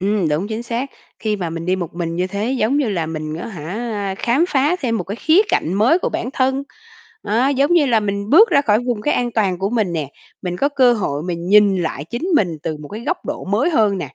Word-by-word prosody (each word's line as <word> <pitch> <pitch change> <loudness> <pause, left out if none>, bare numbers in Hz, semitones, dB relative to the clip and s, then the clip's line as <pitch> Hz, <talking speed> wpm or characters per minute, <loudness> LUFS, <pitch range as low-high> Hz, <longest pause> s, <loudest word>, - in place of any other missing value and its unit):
Ừm, 195 -3 +1
đúng, 160 +8 -1
chính 225 +1 -4
xác. 240 +3 -3 0.3
Khi 215 -1 -1
mà 175 -4 -3
mình 165 +1 -5
đi 185 +1 +1
một 175 -4 -5
mình 170 -1 -3
như 180 +1 0
thế, 205 +5 -3
giống 260 +1 +1
như 265 -6 +1
là, 170 -5 -1
mình 155 -1 -5
á 165 - -6
hả, 200 +3 -4
khám 255 +8 +2
phá 290 +6 +2
thêm 230 -4 0
một - - -3
cái 200 +3 -5
khía 320 +9 +4
cạnh 175 - 0
mới 245 - +4
của - - -1
bản 245 - -3
thân. 265 +1 +1 0.6
Đó, 235 +6 +1
giống 280 +3 +2
như 335 -4 +4
là, 230 -4 +3
mình 200 0 -3
bước 430 +10 +7
ra 285 -4 +4
khỏi 215 -4 +3
vùng 240 -4 -1
cái 295 - +1
an 245 -1 0
toàn 195 -5 0
của 195 +3 -1
mình 215 -7 0
nè, 155 -4 -3 0.3
mình 180 -1 -3
có 280 - +1
cơ 260 -4 +4
hội 150 -10 -2
mình 175 0 -4
nhìn 205 -1 +5
lại 145 -3 -3
chính 235 - -6
mình 175 - 0
từ 155 -1 -3
một 150 -1 -10
cái 215 - -7
góc 360 0 -2
độ 295 +2 -4
mới 205 - +1
hơn 210 - +2
nè. - - -4
210 Hz, 260 wpm, -19 LUFS, 180-255 Hz, 0.6 s, bước